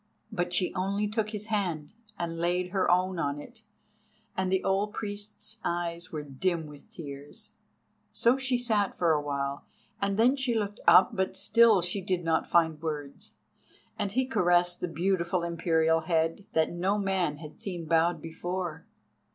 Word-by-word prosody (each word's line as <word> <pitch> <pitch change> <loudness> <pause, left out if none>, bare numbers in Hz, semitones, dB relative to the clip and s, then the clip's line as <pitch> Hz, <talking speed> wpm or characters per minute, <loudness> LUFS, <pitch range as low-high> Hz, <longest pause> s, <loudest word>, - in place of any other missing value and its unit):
But 175 0 -1
she 180 +1 +1
only 195 +2 0
took 215 0 -1
his 210 -1 -4
hand, 180 -7 -2 0.2
and 165 -1 -3
laid 180 +1 0
her 190 -1 +1
own 180 0 +2
in 145 -2 -1
it, 225 +9 -12 0.7
and 190 0 0
the 190 0 +2
old 200 +2 0
priest's 210 +1 -5
eyes 170 0 -3
were 150 -2 -4
dim 160 +4 -1
with 150 -1 -12
tears. 140 -2 -8 0.6
So 235 +2 +3
she 265 -2 0
sat 215 -5 +1
for 170 -2 +3
awhile, 140 -2 -1 0.4
and 200 0 0
then 245 +5 +5
she 265 -4 0
looked 205 0 -3
up, 170 +2 +7
but 190 0 -1
still 215 0 +5
she 180 +3 -2
did 185 -1 -1
not 160 -1 +1
find 160 -2 +2
words. 150 -3 -5 0.6
And 200 -1 -1
he 260 +2 +2
caressed 175 -6 +2
the 180 - -1
beautiful 175 +1 0
Imperial 165 -1 +2
head, 165 +3 0
that 160 -1 +2
no 185 +4 0
man 190 -7 0
had 150 -1 -11
seen 175 -4 -4
bowed 165 0 +2
before. 165 0 -4
180 Hz, 160 wpm, -29 LUFS, 165-200 Hz, 0.7 s, up